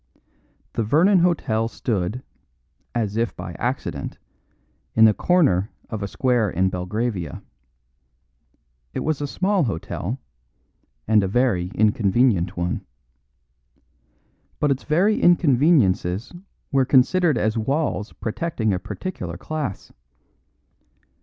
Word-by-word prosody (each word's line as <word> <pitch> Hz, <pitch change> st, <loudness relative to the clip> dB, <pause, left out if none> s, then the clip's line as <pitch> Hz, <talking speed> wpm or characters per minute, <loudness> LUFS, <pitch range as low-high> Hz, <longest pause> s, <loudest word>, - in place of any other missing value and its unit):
The -, -, -1 dB
Vernon 175 Hz, -, +4 dB
Hotel 120 Hz, -11 st, +1 dB
stood, 115 Hz, +1 st, -3 dB, 0.7 s
as 110 Hz, -3 st, -1 dB
if 115 Hz, -1 st, -1 dB
by -, -, -7 dB
accident, -, -, -3 dB, 0.8 s
in 110 Hz, -, +7 dB
the 110 Hz, -, +6 dB
corner 115 Hz, -, +2 dB, 0.2 s
of 110 Hz, -2 st, -4 dB
a 100 Hz, -, -2 dB
square 125 Hz, -2 st, +1 dB
in 95 Hz, +2 st, +1 dB
Belgravia. 90 Hz, +1 st, -3 dB, 1.5 s
It -, -, -1 dB
was 155 Hz, -2 st, -1 dB
a 145 Hz, -, -1 dB
small 190 Hz, +2 st, +1 dB
hotel; 100 Hz, +3 st, -4 dB, 0.9 s
and 110 Hz, -1 st, +4 dB
a -, -, 0 dB
very 100 Hz, -5 st, +1 dB
inconvenient 105 Hz, -3 st, +2 dB
one. 85 Hz, 0 st, -2 dB, 1.8 s
But 145 Hz, -, +2 dB
its 135 Hz, -, -2 dB
very 185 Hz, +8 st, +2 dB
inconveniences 130 Hz, -, +3 dB, 0.4 s
were 135 Hz, -2 st, +3 dB
considered 145 Hz, +4 st, +3 dB
as 110 Hz, 0 st, 0 dB
walls 130 Hz, -1 st, -1 dB
protecting 115 Hz, -2 st, -2 dB
a 90 Hz, -, -1 dB
particular 90 Hz, -, -6 dB
class. 150 Hz, -, -5 dB
115 Hz, 105 wpm, -23 LUFS, 100-150 Hz, 1.8 s, in